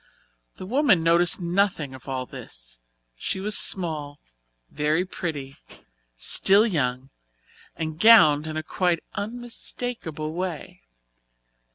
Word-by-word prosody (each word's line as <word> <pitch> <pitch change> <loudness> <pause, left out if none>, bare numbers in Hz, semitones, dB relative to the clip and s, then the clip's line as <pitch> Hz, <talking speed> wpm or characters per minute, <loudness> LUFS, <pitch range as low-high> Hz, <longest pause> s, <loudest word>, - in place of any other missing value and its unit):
The - - -8
woman 230 - +2
noticed 170 +3 +2
nothing 175 -5 -1
of 130 - -13
all 130 -1 -3
this. - - -10 0.4
She 125 - -4
was 210 +2 +2
small, 155 -6 +1 0.5
very 155 +4 0
pretty, 145 -7 -6 0.6
still 195 - +4
young, 135 - -2 0.6
and 160 -1 -5
gowned 160 -9 +6
in 155 0 -5
a 155 - -3
quite 175 -2 -1
unmistakable 225 -7 -4
way. 175 -3 -6
165 Hz, 105 wpm, -24 LUFS, 145-195 Hz, 0.6 s, gowned